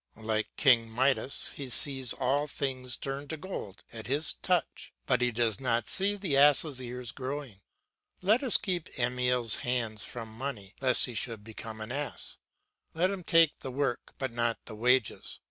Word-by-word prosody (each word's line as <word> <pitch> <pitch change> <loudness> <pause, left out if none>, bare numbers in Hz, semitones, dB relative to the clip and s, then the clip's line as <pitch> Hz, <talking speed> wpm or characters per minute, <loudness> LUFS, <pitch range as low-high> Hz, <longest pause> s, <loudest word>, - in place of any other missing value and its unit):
Like 110 -1 -1
King 120 -5 +5
Midas 130 +3 +1
he 140 -2 -6
sees 130 -1 +3
all 140 +3 0
things 130 -3 -3
turn 140 +1 -5
to 160 - -5
gold 150 - -7
at 110 -1 -7
his 145 +4 +4
touch, - - -1
but - - +2
he 125 0 +3
does 115 -1 0
not 120 -3 0
see 200 +2 +2
the 190 -8 0
ass' 145 0 +5
ears 125 -1 -5
growing. 130 -6 -6 0.6
Let 215 +6 +4
us 260 -5 +3
keep 180 -4 -3
Emile's 125 -2 +2
hands 115 -3 -1
from 115 -2 -6
money 115 -6 -5
lest 130 -2 +5
he 125 - -6
should 115 -2 -3
become 110 0 -8
an 110 +2 -5
ass, 145 +2 -4 0.6
let 180 +4 +2
him 195 -2 -5
take 165 -2 +4
the 135 - -6
work 130 -1 -3
but 135 -2 -3
not 120 0 0
the 115 - -8
wages. 125 +1 +1
125 Hz, 170 wpm, -29 LUFS, 115-145 Hz, 0.6 s, King